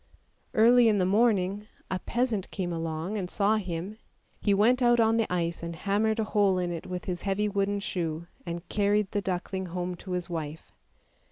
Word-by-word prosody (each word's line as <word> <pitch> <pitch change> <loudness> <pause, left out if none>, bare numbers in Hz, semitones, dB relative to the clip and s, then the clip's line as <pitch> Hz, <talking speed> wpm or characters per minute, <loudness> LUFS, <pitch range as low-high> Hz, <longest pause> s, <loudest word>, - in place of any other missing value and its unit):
Early 235 +2 +6
in 210 - +3
the 185 - +2
morning 205 -1 +2 0.2
a 185 - 0
peasant 230 -2 -1
came 175 -3 -3
along 165 +5 -3
and 180 -2 -4
saw 210 +2 +2
him; 190 +2 -5 0.4
he 205 - +1
went 225 +6 +4
out 240 -1 +4
on 225 0 +4
to 225 - +3
the - - -12
ice 170 -1 -1
and 170 0 -5
hammered 205 +5 +1
a - - +2
hole 205 -3 +2
in 180 -1 -1
it 170 0 -5
with 180 -1 -5
his 180 -2 -3
heavy 200 +1 0
wooden 200 0 0
shoe, 170 -4 -3 0.2
and 170 0 -6
carried 205 0 +1
the 205 - 0
duckling 190 0 -3
home 180 +1 -3
to 185 +1 -7
his 180 -1 -2
wife. 160 -2 -6
195 Hz, 195 wpm, -28 LUFS, 175-210 Hz, 0.4 s, Early